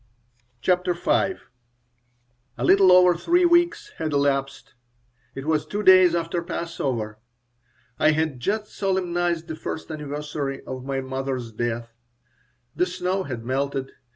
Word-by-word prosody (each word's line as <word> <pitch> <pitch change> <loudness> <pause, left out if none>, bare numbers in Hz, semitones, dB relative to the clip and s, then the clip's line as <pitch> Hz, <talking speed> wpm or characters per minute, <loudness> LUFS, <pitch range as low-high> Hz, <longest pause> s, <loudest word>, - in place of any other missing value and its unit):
CHAPTER 180 +2 +1
V 170 - -7
A 195 - +2 1.2
LITTLE 185 +10 +5
over 180 0 +7
three 345 - +2
weeks 345 +4 +2
had 155 -2 -2
elapsed. 140 -1 -1 0.6
It 135 - -6
was 155 -1 +1
two 210 +1 -4
days 185 -2 +7
after 170 +1 -1
Passover. 130 -11 -4 0.8
I - - +5
had 155 -4 0
just 210 - -2
solemnized 175 -3 -1
the 160 - -5
first 160 +1 -6
anniversary 145 -2 -4
of 130 -1 -6
my 135 -1 -2
mother's 130 -2 -4
death. 120 +1 -3 0.8
The 180 - +1
snow 185 +1 -2
had 120 -4 -6
melted. 135 +1 -2
160 Hz, 125 wpm, -24 LUFS, 135-180 Hz, 1.2 s, over